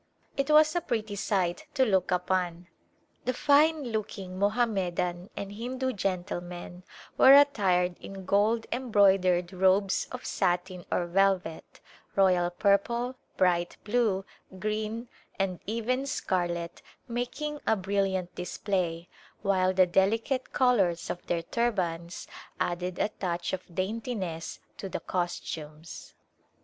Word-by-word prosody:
It 275 +1 -1
was 305 +1 +6
a 350 - +2
pretty 220 -6 -2
sight 190 - -1
to 265 -2 +4
look 190 -5 +2
upon. 180 -1 -1 0.6
The 255 - 0
fine 300 +3 +4
look 215 -1 -3
ing 185 -1 -7
Mohammedan 190 -5 0
and 200 0 -5
Hindu 255 +4 -3
gentlemen 175 -2 -4 0.4
were 265 +1 +10
attired 190 -11 +3
in 195 -1 -9
gold 215 +4 +2
embroidered 195 -7 +3
robes 190 +1 +2
of - - -7
satin 180 0 -1
or 175 - +1
velvet, 185 -2 0 0.3
royal 180 -3 +4
purple, 215 +6 +1 0.2
bright 175 -1 +2
blue, 210 -4 +1 0.3
green 215 +3 -3 0.3
and 190 -2 -1
even 240 +5 -1
scarlet 175 -9 -2 0.3
making 250 +5 -3
a 220 - +4
brilliant 190 -2 -1
display, 180 -2 -2 0.4
while 185 -2 +3
the 185 0 +5
delicate 220 +8 +1
colors 200 -10 +2
of 175 - -6
their 170 -1 0
tur 235 +7 +1
bans 170 -3 -4 0.3
added 175 +1 -2
a - - +1
touch 175 -2 -2
of 180 -2 -6
daintiness 190 -4 -3 0.2
to 195 - -6
the - - -3
costumes. 160 -3 -5
195 Hz, 120 wpm, -28 LUFS, 180-230 Hz, 0.6 s, were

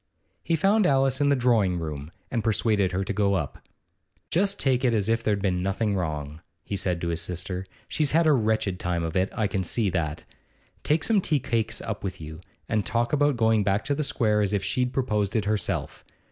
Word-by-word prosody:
He 165 - +1
found 195 +5 +3
Alice 135 0 +2
in 140 - +4
the 140 - +4
drawing 115 -8 +2
room, 75 -2 -5 0.2
and 115 - -1
persuaded 105 -3 +1
her 95 +2 -1
to 95 - -3
go 100 -1 +2
up. 75 -7 -3 0.7
'Just 195 +3 +1
take 130 -1 +1
it 120 -3 +3
as 105 -2 +1
if 115 0 +1
there 105 -2 +2
'd 100 - -6
been 90 -3 +1
nothing 100 +3 0
wrong,' 75 -3 -3 0.2
he 100 - -4
said 90 -3 0
to 85 - -1
his 85 -1 -1
sister. 90 +1 -4 0.2
'She's 150 -2 +1
had 165 +3 +3
a 155 - +5
wretched 110 -6 0
time 85 -1 -1
of 80 -1 -4
it, 95 +1 +2
I 110 - 0
can 100 -1 -1
see 100 +3 0
that. 80 -3 -2 0.6
Take 155 +2 +1
some 215 -4 +3
tea 155 -4 +1
cakes 115 -2 -1
up 110 -3 -5
with 95 -1 -4
you, 80 +1 -9 0.3
and 110 -1 0
talk 120 +4 -1
about 145 -2 +3
going 110 -2 +3
back 100 +4 0
to 145 - 0
the 145 - -1
Square 115 -7 +1
as 105 0 0
if 100 -2 0
she'd 125 -1 0
proposed 105 -7 -1
it 110 -2 +1
herself. 105 -3 -2
105 Hz, 220 wpm, -26 LUFS, 95-125 Hz, 0.7 s, a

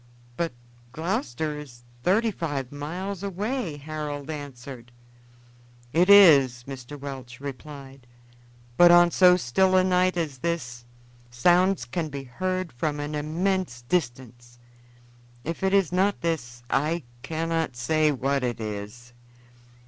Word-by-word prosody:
"But 170 +3 -1 0.4
Gloucester 155 -2 -2
is 120 -5 -12 0.2
thirty 215 - +2
five 145 -9 -4
miles 175 +7 -5
away," 200 - -3
Harold 150 0 -5
answered. 130 -4 -9 1.0
"It 180 +4 +3
is," 140 -12 +7
Mr. 135 +1 -8
Welch 135 -3 -8
replied; 140 -1 -9 0.7
"but 175 0 +8
on 175 0 +7
so 180 0 +6
still 185 +6 +2
a 185 - +5
night 185 0 +2
as 150 -6 -3
this 125 -7 -3 0.4
sounds 175 +5 +3
can 155 +6 -3
be 140 -1 -6
heard 185 +6 -3
from 145 +4 -2
an 145 +1 -4
immense 155 -3 -2
distance. 120 -5 -3 0.9
If 165 +4 -5
it 190 0 +1
is 195 -4 +3
not 195 +3 +1
this, 125 -8 -3
I 155 +6 0 0.2
cannot 160 -1 -2
say 155 +5 +2
what 135 0 -1
it 120 -2 -2
is." 110 +3 -7
150 Hz, 125 wpm, -25 LUFS, 125-175 Hz, 1.0 s, but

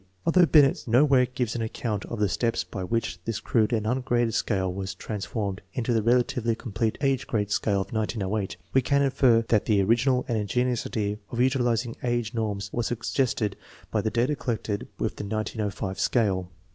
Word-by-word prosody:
Although 175 +1 +5
Binet 145 -4 +4
nowhere 130 +1 +4
gives 125 -2 -2
any 115 -1 -1
account 110 -2 -3
of 115 - -6
the 105 - +3
steps 115 +5 0
by 95 - -6
which 105 -3 -2
this 115 -2 -2
crude 110 0 +1
and 110 -3 0
ungraded 120 -1 +1
scale 95 -4 0
was 95 0 -4
trans 105 +1 -5
formed 100 -4 -3
into 120 -1 -1
the 115 - +2
relatively 120 0 +2
complete 115 0 -2
age 135 -1 +1
grade 105 -3 -1
scale 100 -1 +1
of - - -6
Ig08, 105 -2 -2 0.2
we 130 - +5
can 140 +3 +2
infer 125 -4 +4
that 110 -3 +3
the 105 -2 +3
original 120 +5 +2
and 115 -3 0
ingenious 125 +4 0
idea 105 -1 -2
of 120 - -6
utiliz 125 -2 +2
ing 115 - -6
age 120 -2 -1
norms 105 -4 -3
was 120 -1 -1
suggested 115 -3 -1 0.4
by - - +1
the 110 - 0
data 125 +6 +1
collected 110 -6 -3
with - - -2
the - - -4
1905 105 -2 -3
scale. 95 -7 +1
115 Hz, 185 wpm, -26 LUFS, 105-125 Hz, 0.4 s, Although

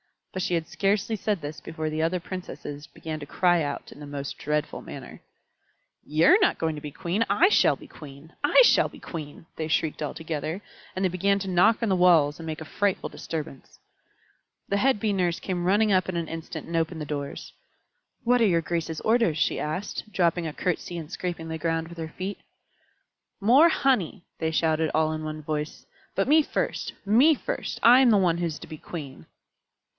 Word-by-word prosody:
But 185 - -3
she 180 -1 0
had 165 -1 -1
scarcely 205 +2 0
said 205 -3 -1
this 145 +1 -6
before 160 0 -4
the 155 +1 -2
other 165 +3 +1
Princesses 165 -5 -7
began 160 -1 -6
to 145 - -7
cry 175 +3 +2
out 145 -2 -4
in - - -13
the 145 - -8
most 140 -1 -5
dreadful 150 0 -2
manner. - - -10 0.8
"You're 160 - +5
not 380 - +3
going 160 -1 -1
to 150 - -7
be 150 - -6
Queen! 180 +7 -1
I 330 - +5
shall - - +4
be - - -14
Queen! 145 +2 -13
I 290 +12 +6
shall - - +5
be - - -14
Queen!" 155 -2 -8
they 155 - -2
shrieked 155 0 0
all 150 - -2
together, 160 +3 -4 0.3
and 190 - -1
they - - +3
began 195 +3 +1
to 195 -1 -4
knock 205 +6 +4
on 225 - +1
the 190 - +2
walls 165 -5 +4
and 165 - -7
make 160 0 -5
a - - -6
frightful 200 +4 -1
disturbance. 150 -4 -7 0.9
The 200 - +1
head 260 +1 +2
Bee 215 -2 +1
Nurse 175 -3 0
came 180 -2 -3
running 205 +3 +3
up 185 -1 +3
in 185 - -3
an 170 -2 -2
instant 165 0 -6
and 165 0 -2
opened 160 0 -1
the - - -3
doors. 145 -1 -5 0.7
"What 245 +1 +3
are - - +6
your 170 -3 +3
graces' 165 -1 -3
orders?" 225 -8 +2
she - - +1
asked, 185 +7 -4
dropping 175 -3 +1
a 155 - -5
curtsy 175 0 -2
and 160 0 -7
scraping 170 -3 -4
the 160 0 -4
ground 165 0 -1
with 170 - -11
her 160 -1 -5
feet. 190 +2 -4 1.0
"More 265 +11 +6
honey!" 220 - +1 0.2
they 160 - 0
shouted, 160 -1 +1
all 155 0 +2
in 155 0 -4
one 155 0 -5
voice. 150 0 -4 0.3
"But 195 - +1
me 310 +2 +7
first - - -2
me 250 +10 +5
first. - - -4
I 245 +2 +8
am 260 -2 +6
the 215 - +5
one 175 -3 +2
who 175 - -1
is 160 -3 -3
to - - -10
be 155 - -8
queen." 140 - -8
170 Hz, 205 wpm, -26 LUFS, 155-195 Hz, 1.0 s, I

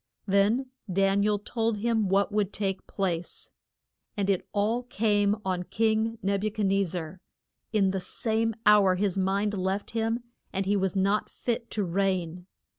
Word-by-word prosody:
Then 210 +7 +2 0.2
Dan 195 +2 +3
i 205 - +2
el 210 -1 +2
told 225 +1 -1
him 220 -2 +1
what 200 +2 +2
would 205 -2 0
take 195 -2 -3
place. 180 -3 -3 0.7
And 200 -1 +2
it 190 - -1
all 215 +4 +1
came 205 -3 +1
on 185 -2 0
king 220 +3 0
Neb 200 +1 0
u 215 - +1
chad 210 0 -2
nez 195 0 +2
zar. 175 +1 -5 0.5
In 200 -3 +3
the 190 -1 -2
same 225 +3 -1
hour 200 -3 +6
his 195 -1 0
mind 200 +2 +1
left 190 +1 -2
him 225 +1 -1 0.3
and 195 0 -2
he 200 +2 +2
was 190 0 0
not 200 +2 +1
fit 235 -1 -3
to 210 - -1
reign. 180 -1 -1
200 Hz, 170 wpm, -27 LUFS, 190-220 Hz, 0.7 s, hour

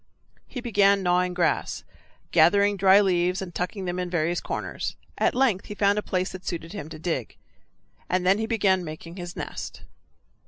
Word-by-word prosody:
He 250 - -6
began 200 -4 +3
gnawing 180 0 +1
grass, 175 - 0 0.5
gathering 205 0 +5
dry 195 +1 +6
leaves 180 -1 +1
and 185 -3 -6
tucking 185 +3 -3
them 180 0 -2
in 180 -1 -2
various 170 0 0
corners. - - -4 0.2
At - - +2
length 245 -7 +2
he 210 - -6
found 205 0 +3
a - - -2
place 185 -2 -2
that 185 0 -9
suited 165 -1 -5
him 180 -7 -6
to 155 - -8
dig, 155 -7 -3 0.7
and 180 0 0
then 195 +3 +4
he 220 - -1
began 195 -5 +2
making 165 +2 -8
his 175 0 -7
nest. - - -6
185 Hz, 180 wpm, -25 LUFS, 175-200 Hz, 0.7 s, dry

